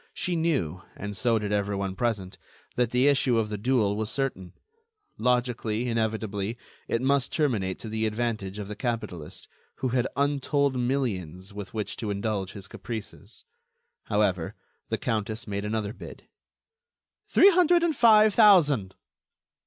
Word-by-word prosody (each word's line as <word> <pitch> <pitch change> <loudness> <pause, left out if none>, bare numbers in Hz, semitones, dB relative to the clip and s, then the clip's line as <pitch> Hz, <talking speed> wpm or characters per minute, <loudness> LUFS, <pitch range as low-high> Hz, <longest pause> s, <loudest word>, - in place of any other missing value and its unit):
She 180 - -1
knew, 135 - 0
and 100 +1 -6
so 115 +2 +2
did 105 -1 -3
everyone 100 -2 -1
present, 95 -4 -2 0.4
that 120 -2 +1
the 125 +3 +3
issue 130 -4 +3
of 110 -2 0
the 105 - -3
duel 110 -3 +2
was 110 0 -2
certain; 110 -9 -3 0.7
logically, 120 -2 0
inevitably, 110 -2 -2 0.3
it 115 - -1
must 135 -1 +2
terminate 110 - 0
to - - -8
the 110 0 -1
advantage 110 -3 -3
of 105 -2 -5
the 105 - -6
capitalist, 110 - -4 0.3
who 130 - -2
had 125 0 +1
untold 140 0 +1
millions 100 - -2
with 100 0 -8
which 105 -2 -3
to 110 - -4
indulge 100 -1 -2
his 100 -1 -9
caprices. 110 -3 -8 0.6
However, 95 -5 0 0.3
the - - 0
countess 110 0 -2
made 100 -1 -3
another 105 -1 -2
bid: - - -11 1.0
"Three 400 - +7
hundred 350 -1 +4
and 330 -3 +1
five 215 -3 +6
thousand." 150 - +5
110 Hz, 145 wpm, -27 LUFS, 100-130 Hz, 1.0 s, Three